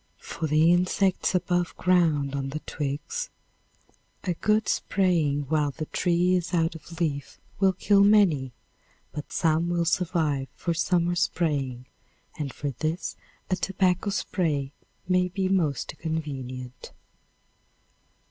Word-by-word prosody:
For 160 - -4
the 155 +3 +5
insects 185 +1 +1
above 175 -1 0
ground 160 -6 +2
on 135 -1 -2
the 155 +3 -5
twigs, 155 - -4 0.9
a 180 - 0
good 215 +5 +1
spraying 165 -7 +1
while 145 +1 +1
the 150 +3 -5
tree 175 +2 +1
is 180 0 0
out 165 -1 +2
of 165 +1 -11
leaf 145 -5 -2 0.2
will 190 -1 +4
kill 200 +2 +4
many, 190 -11 +4 0.6
but 150 - -7
some 165 -1 +1
will 170 -1 +1
survive 160 -6 0
for 170 - -1
summer 175 +1 +1
spraying, 145 -8 -1 0.5
and 145 -3 -4
for 145 +2 -4
this 155 +7 -3 0.4
a - - +4
tobacco 185 +1 +1
spray 150 -8 -1 0.4
may 180 0 +3
be 190 +1 -1
most 170 -8 0
convenient. 130 -6 -5
165 Hz, 125 wpm, -26 LUFS, 145-180 Hz, 0.9 s, the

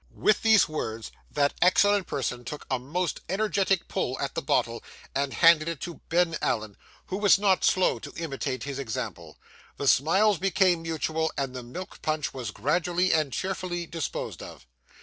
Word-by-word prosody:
With 215 - +2
these 220 -3 +5
words, 115 -8 -5 0.2
that 145 -1 +1
excellent 200 +2 +4
person 125 -2 -3
took 145 +5 -7
a 130 - +1
most 165 +7 -3
energetic 195 -2 +1
pull 130 +1 -2
at 140 - -2
the - - -2
bottle, 115 -3 0 0.3
and 140 0 -1
handed 165 0 +5
it 165 -4 -4
to 175 -2 -7
Ben 165 -1 +2
Allen, 110 -3 -1 0.3
who 190 - -4
was 205 -2 +5
not 195 -2 +2
slow 185 - +3
to - - -9
imitate 135 -5 -3
his 140 -1 -5
example. 110 - -5 0.4
The 140 - -2
smiles 190 +9 +4
became 185 -2 +2
mutual, 160 0 -1
and 135 -2 -2
the 125 - -4
milk 130 +11 -9
punch 155 -2 -1
was 125 -5 -5
gradually 175 - +1
and 155 -4 +1
cheerfully 180 +3 -3
disposed 165 -2 -5
of. - - -11
160 Hz, 170 wpm, -27 LUFS, 135-185 Hz, 0.4 s, these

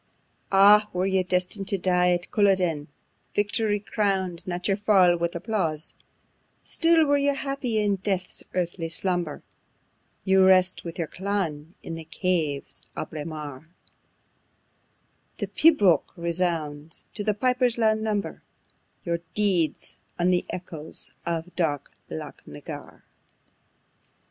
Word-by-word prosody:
Ah! 205 +2 +7
were 180 +1 0
you 190 -1 +2
destined 185 +2 -1
to 195 - 0
die 180 -1 +3
at 175 0 -1
Culloden, 185 -7 +2 0.5
Victory 205 0 +1
crown'd 190 -4 -1
not 180 0 -2
your 195 - +3
fall 195 -4 +4
with 170 0 -2
applause: 170 -5 -2 0.7
Still 330 -1 +4
were 285 0 +3
you 280 0 +2
happy, 275 -5 -2
in 205 -2 +1
death's 190 -2 -3
earthy 175 -2 -2
slumber, 175 -3 -2 0.8
You 190 0 +5
rest 185 -1 +4
with 165 -1 -7
your 170 - -1
clan, 175 -4 -3
in - - -6
the 165 0 -6
caves 155 -5 -2
of - - -5
Braemar; 155 -1 -7 1.7
The - - -2
Pibroch 205 - +4
resounds, 165 -3 -2
to 210 - -4
the 210 -1 +1
piper's 250 +1 +1
loud 220 -1 +3
number, 215 -2 -2 0.6
Your 170 -1 0 0.2
deeds, 190 -7 0 0.2
on 180 +1 +2
the 180 - +1
echoes 165 -4 -6 0.2
of 170 +1 -3
dark 150 -6 -1 0.2
Loch 80 - -7
na 75 0 -9
Garr. - - -9
185 Hz, 125 wpm, -26 LUFS, 170-205 Hz, 1.7 s, Ah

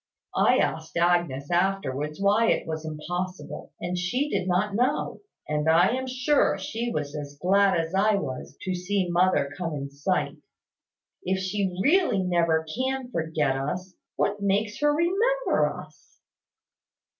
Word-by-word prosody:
I - - +4
asked 160 +1 -1
Agnes 170 -5 +1
afterwards 160 -5 0
why 205 +3 +3
it - - +1
was 160 -1 -4
impossible; 175 +4 -5
and 175 +1 -3
she 245 +12 -1
did 185 - -1
not 190 +3 +1
know; 245 +5 0 0.3
and 150 +1 0
I 170 +3 +5
am 260 +2 -2
sure 255 +3 +2
she 235 +2 -3
was 150 -4 -3
as 145 -1 -7
glad 195 +1 +3
as 165 +1 -3
I 205 +2 +3
was 135 -6 -5
to 185 - -1
see 180 0 -1
mother 175 -5 +2
come 170 -4 -3
in 140 -1 -5
sight. 145 0 -1 0.8
If 190 +1 0
she 190 -1 -2
really 310 - +3
never 170 -3 +2
can 260 0 -2
forget 160 - 0
us, 180 +8 -4 0.2
what 205 0 0
makes 200 +2 0
her 295 0 +4
remember 395 +11 +2
us?" - - -13
180 Hz, 145 wpm, -26 LUFS, 160-210 Hz, 0.8 s, I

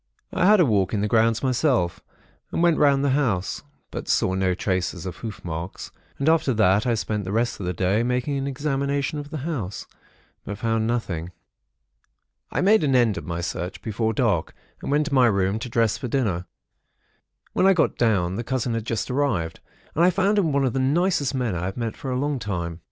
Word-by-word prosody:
"I 180 0 +3
had 210 0 +6
a 175 - +6
walk 100 -4 +1
in 100 - 0
the 105 - +1
grounds 115 +1 +2
myself, 125 - +1 0.5
and 170 - 0
went 170 -2 +4
round 140 -1 +4
the 140 - +2
house, 120 -10 0 0.3
but - - -6
saw 95 - +2
no 95 -1 +1
traces 90 -2 -2
of 90 -2 -5
hoof 110 -5 -7
marks; 85 +2 -5 0.3
and 140 - -2
after 160 -6 +3
that, 105 +1 +3
I 120 - +2
spent 105 -1 -2
the 95 - -5
rest 115 +2 0
of 95 - -4
the 90 - -1
day, 95 +5 +1
making 125 +4 0
an 135 0 -2
examination 140 +1 -1
of 145 0 -7
the 155 -3 -5
house; 120 - -4 0.6
but 100 - -6
found 115 0 0
nothing. 90 -8 -2 1.2
"I - - -1
made 205 0 +4
an 135 -3 +2
end 120 -5 +4
of - - -11
my 85 0 -3
search, 90 +2 -4
before 110 0 -1
dark, 110 -8 0 0.3
and - - -5
went 150 +2 +2
to 150 - -4
my 130 -3 +5
room 100 0 +1
to 125 +2 -6
dress 115 -2 +1
for 125 - -4
dinner. 105 -9 -1 1.1
When 190 - +3
I 195 - +7
got 170 -3 +1
down, 95 -6 +1
the 120 - -2
cousin 125 -1 -1
had 115 -1 -3
just 115 +3 -2
arrived; 125 - -1 0.3
and 165 - +2
I 180 - +6
found 195 +3 +2
him 165 -6 +1
one 140 -1 +2
of 125 - 0
the 135 - 0
nicest 145 +1 +1
men 125 -5 -1
I 85 0 -3
have 95 +4 -4
met 115 -2 -3
for 135 - -6
a 125 - -1
long 145 0 -1
time. 85 -6 -4
115 Hz, 215 wpm, -24 LUFS, 95-140 Hz, 1.2 s, I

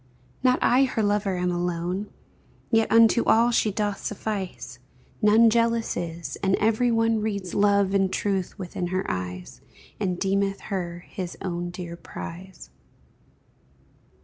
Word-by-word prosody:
Not 255 -1 +4
I 260 +2 +5
her 230 -4 -1
lover 205 -2 +1
am 180 0 0
alone, 175 +3 -2 0.6
Yet 225 -1 +3
unto 230 +1 +5
all 235 +2 +4
she 220 -2 +2
doth 205 0 -2
suffice, 195 - -5 0.4
None 215 +2 +6
jealous 230 0 +1
is, 170 0 -5
and 195 0 +1
every 225 +3 +2
one 225 -1 +2
Reads 200 -4 -3
love 200 -1 +3
and 195 -1 +2
truth 195 -3 -2
within 180 -1 -4
her 185 +2 -2
eyes, 90 0 -5 0.4
And 185 -4 -1
deemeth 195 0 0
her 175 -2 -4
his 185 -4 -6
own 175 -2 -3
dear 175 -1 -7
prize. 170 - -9
195 Hz, 135 wpm, -25 LUFS, 180-220 Hz, 0.6 s, None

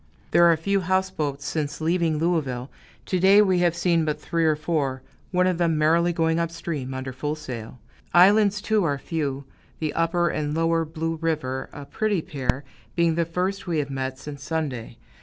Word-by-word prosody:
There 170 0 +6
are 165 - +2
few 200 +5 +1
houseboats, 180 -6 -1
since 150 -2 -3
leaving 165 -1 +1
Louisville; 145 -6 -1 0.3
to 185 - 0
day 195 +3 +6
we 185 -3 +2
have 175 -1 +2
seen 170 -1 +2
but 155 -1 -2
three 165 -1 -1
or 155 -1 +3
four 145 -5 -2 0.3
one 180 0 +2
of 180 -2 +1
them 165 -2 +2
merrily 165 +3 +3
going 165 -1 +1
up 170 -1 0
stream, 150 -6 -5
under 130 0 -5
full 145 +4 -3
sail. 125 -6 -8 0.3
Islands, 200 +2 +5
too, 215 -2 +2
are 145 -4 0
few 140 -2 -3 0.3
the 155 -2 -2
Upper 170 +1 +1
and 150 -1 -2
Lower 165 0 +1
Blue 165 +1 -3
River, 150 -5 -2
a 145 - -9
pretty 205 +2 -1
pair, 135 -1 -2 0.3
being 170 -1 +3
the 170 +1 +1
first 185 +4 -2
we 170 -2 0
have 140 -2 -2
met 130 -1 -3
since 145 0 -9
Sunday. 140 -8 -4
160 Hz, 185 wpm, -24 LUFS, 145-175 Hz, 0.3 s, There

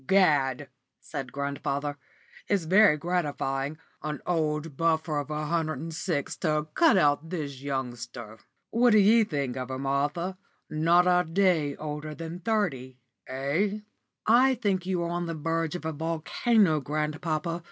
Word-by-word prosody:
"Gad!" 145 -8 +3 0.3
said 130 -2 -6
grandfather, 140 +1 -3 0.5
"it's 200 -4 +1
very 190 0 +5
gratifying 145 -4 -2 0.2
an 150 -1 -4
old 155 -3 -1
buffer 160 -1 +1
of 145 0 -5
a 150 0 -2
hundred 155 -1 -1
and 165 +4 -6
six 155 -2 -2
to 155 -3 0
cut 285 - +5
out 150 -1 +2
this 145 -7 -5
youngster. 120 -5 -5 0.3
What 235 0 +4
d' - - +6
ye 215 +2 +6
think 140 - -3
of 130 0 -4
her, 130 - -3
Martha? 145 +7 -1 0.3
Not 170 +3 +4
a 180 -2 +3
day 165 -6 +2
older 150 0 -5
than 165 +2 -6
thirty 165 - -1 0.3
eh?" 155 +11 -1 0.4
"I 255 +4 +5
think 195 -6 -1
you 180 -2 0
are 170 - -3
on 175 0 -2
the 165 - -3
verge 165 +1 -1
of 175 - -6
a 160 - -1
volcano, 165 +4 +1
grandpapa. 155 +3 -2
155 Hz, 150 wpm, -27 LUFS, 145-180 Hz, 0.5 s, d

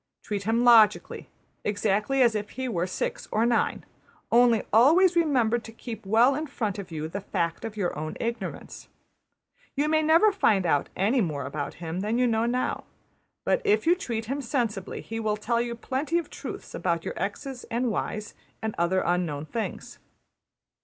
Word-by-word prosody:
Treat 200 -2 -4
him 230 +2 +2
logically, 230 -3 +4 0.3
exactly 210 +5 +1
as 235 -2 +4
if 210 -1 -3
he 260 0 -4
were 180 -6 -1
six 185 - -3
or 220 +2 +2
nine; 235 -1 +1 0.5
only 235 -1 +5
always 330 - +6
remember 255 -9 +2
to 225 - -11
keep 225 -2 -8
well 230 +6 +5
in 305 +3 -3
front 215 -8 -3
of 195 - -7
you 155 -2 -4
\emph{the 200 +5 -5
fact 170 -1 -2
of 220 -1 -6
your 185 -4 -1
own 155 +1 -5
ignorance}. 235 +1 -5 0.9
You 290 +2 +1
may 310 0 +3
never 330 +7 +5
find 210 - +2
out 145 -4 +1
any 225 +7 +2
more 150 -8 -2
about 140 +1 -4
him 165 +1 -5
than 215 +4 -1
you 250 - +3
know 230 -1 +1
now; 250 +1 -1 0.6
but - - +2
if 420 -3 +2
you 335 - +6
treat 235 - -3
him 275 +5 -3
sensibly 235 -7 -2
he 225 0 -5
will 215 -1 0
tell 235 +2 0
you 235 0 -3
plenty 270 +7 -1
of 340 - -3
truths - - -8
about 170 -2 -1
your - - -3
$x$'s 255 +5 -4
and 240 +1 -1
$y$'s, 215 0 -3 0.3
and 220 -1 -3
other 180 +2 +2
unknown 170 -4 -1
things. 225 +7 -5
225 Hz, 180 wpm, -26 LUFS, 195-255 Hz, 0.9 s, always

